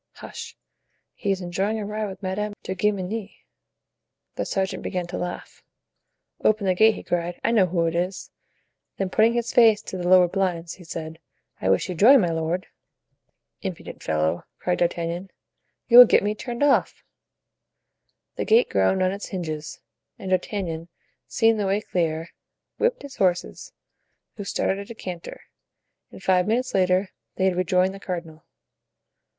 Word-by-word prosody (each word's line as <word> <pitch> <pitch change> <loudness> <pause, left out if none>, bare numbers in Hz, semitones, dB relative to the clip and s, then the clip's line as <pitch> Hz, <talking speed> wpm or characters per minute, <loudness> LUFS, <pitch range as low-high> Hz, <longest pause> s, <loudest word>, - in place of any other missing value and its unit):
"Hush; - - -9 0.6
he 200 - -4
is 195 -1 0
enjoying 190 +5 -1
a 210 - -4
ride 210 +1 -3
with 195 +1 -9
Madame 205 +3 -2
de 190 - -3
Guemenee." 205 +2 -2 0.9
The - - -3
sergeant 190 0 -2
began 180 -1 -3
to 175 +1 -6
laugh. 175 0 -6 0.8
"Open 215 -1 +2
the 185 - +3
gate," 220 +4 +5
he - - -9
cried. 175 0 -2
"I - - +2
know 205 -5 +4
who 170 -1 0
it 165 - 0
is!" 180 +3 -3 0.7
Then 190 -1 -2
putting 225 +3 +4
his 235 -1 -2
face 225 -3 +6
to 190 - -6
the 175 - -2
lowered 180 -1 +6
blinds, 175 -4 -1
he 185 - -13
said: 160 -1 -7 0.4
"I 95 - 0
wish 95 - +2
you 185 - -3
joy, 225 +11 +7
my 180 -9 +2
lord!" 165 +3 -2 1.0
"Impudent - - -7
fellow!" 80 +1 0
cried 180 - -1
D'Artagnan, 175 +2 -1 0.6
"you 240 0 +9
will 250 - +13
get - - +4
me 205 +1 0
turned 240 +4 -4
off." 290 - +2 1.3
The - - -2
gate 225 +3 +4
groaned 100 - +2
on 185 - +2
its 200 +1 -6
hinges, 155 -5 -5 0.4
and 190 - -6
D'Artagnan, 180 -3 -2 0.4
seeing 225 -1 +3
the 205 -2 -1
way 195 +2 +1
clear, 165 -4 -2 0.5
whipped 485 +1 +1
his 280 -2 -10
horses, 180 -2 -1 0.7
who 205 - -6
started 195 0 -1
at 200 - -8
a 230 - -8
canter, 180 -5 -7 0.7
and - - -13
five 185 0 +3
minutes 250 +4 0
later 185 +1 +2 0.2
they 190 - 0
had 190 -1 +2
rejoined 185 +1 +2
the 195 - -9
cardinal. 170 -5 -6
185 Hz, 165 wpm, -24 LUFS, 175-210 Hz, 1.3 s, will